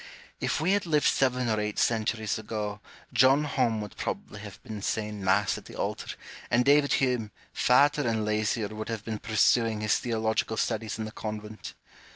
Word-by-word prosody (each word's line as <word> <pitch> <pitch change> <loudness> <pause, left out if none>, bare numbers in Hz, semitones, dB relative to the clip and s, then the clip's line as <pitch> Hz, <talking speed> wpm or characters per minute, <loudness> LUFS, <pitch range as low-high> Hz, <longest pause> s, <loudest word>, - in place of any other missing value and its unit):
If - - -1
we 165 +5 +1
had 200 -3 +1
lived 150 -2 +2
seven 125 -2 +2
or 110 -1 +1
eight 105 0 -3
centuries 110 -1 0
ago, 105 -1 -4 0.3
John 130 +4 +5
Home 125 -6 0
would 105 -2 -8
probably - - -4
have - - -10
been 110 -2 -7
saying 105 -1 -3
Mass 95 +2 +2
at - - -18
the - - -11
altar, - - -3 0.3
and 125 +1 +3
David 145 0 +4
Hume, 125 -5 +1 0.2
fatter 145 +2 +4
and 110 -2 0
lazier, 105 0 0
would 110 +1 -6
have 110 -2 -4
been 110 -2 -4
pursuing 110 0 +2
his 110 -1 +2
theological 110 -1 -1
studies 110 -2 -1
in 110 - -3
the 110 - -7
convent. 105 0 -7
110 Hz, 180 wpm, -28 LUFS, 105-125 Hz, 0.3 s, John